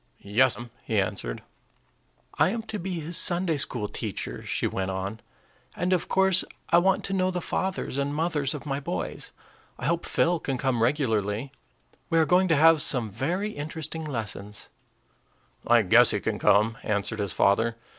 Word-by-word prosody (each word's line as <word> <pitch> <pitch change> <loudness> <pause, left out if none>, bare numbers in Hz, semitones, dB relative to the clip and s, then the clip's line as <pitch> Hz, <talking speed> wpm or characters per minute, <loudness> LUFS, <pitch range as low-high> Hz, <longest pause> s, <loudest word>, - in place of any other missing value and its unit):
"Yes'm," 120 +2 +1
he - - 0
answered. - - -3 1.0
"I - - +5
am 225 +3 -3
to 220 -1 -5
be 180 -1 -4
his 165 +3 -2
Sunday 175 -3 +2
school 120 -6 0
teacher," - - -5
she - - -2
went 95 0 -2
on; 95 +3 -4 0.6
"and 180 +1 0
of 180 - 0
course 190 -1 +4 0.3
I 170 - +7
want 190 +1 +2
to 195 - -3
know 185 -1 +1
the 180 -1 -2
fathers 185 -6 -2
and 140 +1 -1
mothers 150 -3 0
of 150 - -8
my 140 -1 -2
boys. 90 -11 -4 0.5
I - - -6
hope 170 +3 0
Phil 170 0 +2
can 135 -4 -3
come 130 -3 0
regularly. 115 -2 0 0.6
We 165 - +2
are 160 - +5
going 180 +3 +3
to 165 - +3
have 160 +1 +6
some 120 -9 -1
very 175 - -2
interesting 155 0 -3
lessons." 105 -7 -5 1.0
"I - - +5
guess - - +6
he - - 0
can - - -3
come," 110 +2 +3
answered 105 +1 -2
his 100 -2 -2
father. 115 +4 +2
145 Hz, 170 wpm, -26 LUFS, 110-175 Hz, 1.0 s, I